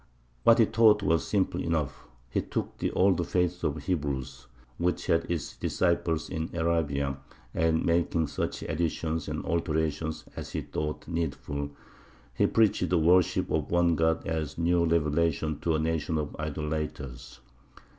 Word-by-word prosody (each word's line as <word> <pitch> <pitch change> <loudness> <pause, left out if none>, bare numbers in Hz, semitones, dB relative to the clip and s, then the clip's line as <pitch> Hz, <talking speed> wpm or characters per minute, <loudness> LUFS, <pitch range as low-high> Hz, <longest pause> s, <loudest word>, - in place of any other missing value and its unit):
What 115 - +6
he 115 - +6
taught 105 -2 +4
was 80 -5 +2
simple 100 -3 0
enough. 75 -4 -2 0.3
He - - +1
took - - -4
the - - 0
old 90 -3 +3
faith 90 -1 0
of 75 -1 +1
the 75 - -7
Hebrews, 70 -6 -3 0.3
which 90 +1 0
had 85 0 +1
its 85 -4 -3
disciples 85 -2 0
in 80 0 -3
Arabia, 75 -5 0 0.3
and, 80 0 +1
making 85 -1 +2
such - - -3
additions 80 0 -2
and - - -4
alterations 80 -2 -1
as - - -7
he - - -1
thought 75 0 -4
needful, 75 -3 -3 0.6
he - - +3
preached 110 -3 +2
the 90 - +3
worship 90 +3 +3
of 75 -2 0
One 85 0 +3
God 80 0 +1
as 80 -2 -3
a - - -2
new 85 0 +3
revelation 80 -1 +1
to 85 -2 +1
a - - +1
nation 80 0 0
of 75 -2 -3
idolaters. 75 -3 -4
80 Hz, 155 wpm, -28 LUFS, 75-85 Hz, 0.6 s, What